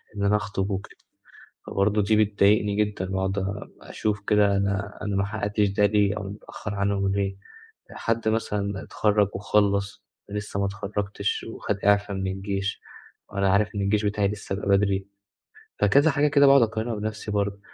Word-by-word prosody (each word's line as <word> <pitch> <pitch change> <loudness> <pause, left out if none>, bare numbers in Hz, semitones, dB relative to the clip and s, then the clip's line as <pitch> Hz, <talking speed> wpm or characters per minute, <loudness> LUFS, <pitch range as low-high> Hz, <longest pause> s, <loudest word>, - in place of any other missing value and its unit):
إن 100 - -3
أنا 100 +1 +3
أخطب 100 -2 -2
وكده، 95 0 -5 0.7
فبرضه 105 +2 +1
دي 105 +2 +2
بتضايقني 100 0 +2
جدًا 105 -3 -1
وأقعد 95 +1 -1
أ 100 +1 -4
أشوف 105 -1 -3
كده 105 -1 +4
أنا 100 +1 -2
أنا 105 -1 -2
ما 95 - +2
حققتش 105 0 0
ده 100 +1 +3
ليه؟ 105 0 +2
أو - - -5
متأخر 105 +1 -7
عنهم 100 0 0
ليه؟ 100 -1 -1 0.5
حد 115 -1 -1
مثلًا 100 -3 -1
اتخرج 105 -2 +2
وخَلّص، 100 0 0 0.2
وأنا 105 - -3
لسه 100 -1 -4
ما 100 - +1
اتخرجتش، 100 0 -3
وخد 105 -2 -3
إعفا 100 0 +3
من 95 0 -2
الجيش 95 +1 -3 0.5
وأنا 100 -1 0
عارف 100 +2 +2
إن - - -1
الجيش 105 +2 +1
بتاعي 105 -1 +1
لسه 105 -1 -4
ب 100 - -4
بدري. 100 -1 +2 0.7
فكذا 140 +10 +4
حاجة 145 +1 +2
كده 140 -1 +5
باقعد 135 -1 +7
أقارنها 115 +1 -1
بنفْسي 105 0 -4
برضه، 100 -1 -1
100 Hz, 165 wpm, -25 LUFS, 100-105 Hz, 0.7 s, باقعد